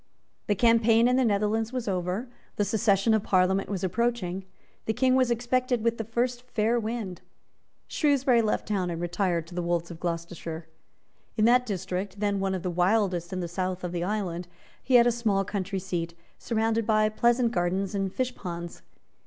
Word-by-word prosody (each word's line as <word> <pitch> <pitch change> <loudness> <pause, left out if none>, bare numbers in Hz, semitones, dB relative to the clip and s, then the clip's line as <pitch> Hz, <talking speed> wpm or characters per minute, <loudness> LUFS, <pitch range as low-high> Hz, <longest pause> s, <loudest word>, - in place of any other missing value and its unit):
The 205 - +2
campaign 230 +1 +4
in 250 - +3
the 260 - +3
Netherlands 215 +1 +1
was 255 -3 -4
over. 185 +5 -2 0.3
The 205 - +1
session 205 0 +2
of 220 - +3
Parliament 190 0 +2
was 195 -3 -3
approaching. 190 -2 -1 0.4
The 220 - +1
King 255 +1 +3
was 255 -1 +3
expected 245 0 0
with 230 0 0
the - - -1
first 240 +3 -1
fair 235 -1 0
wind. 220 -5 -4 0.7
Shrewsbury 275 -5 +3
left 215 -1 -1
town 195 -4 0
and 170 -1 -4
retired 175 -1 -1
to 165 - -13
the 175 - -2
Wolds 170 0 -1
of 165 - -9
Gloucestershire. 170 -1 -4 0.7
In 215 - +4
that 250 +1 +4
district, 190 0 -4
then 205 -1 0
one 190 0 0
of 185 - -5
the 180 - -1
wildest 180 -1 +1
in 185 -1 -3
the 175 - -3
south 185 +1 -3
of 180 - -3
the 175 -1 -2
island, 180 -3 -2 0.3
he 260 - +1
had 235 -1 +8
a 240 - +4
small 215 -4 0
country 195 -1 -3
seat, 175 -3 -3 0.2
surrounded 225 -1 0
by 215 -1 +4
pleasant 235 +2 +2
gardens 185 0 -1
and 195 -1 -1
fish 255 +4 -2
ponds. 170 -4 -7
205 Hz, 185 wpm, -27 LUFS, 180-230 Hz, 0.7 s, had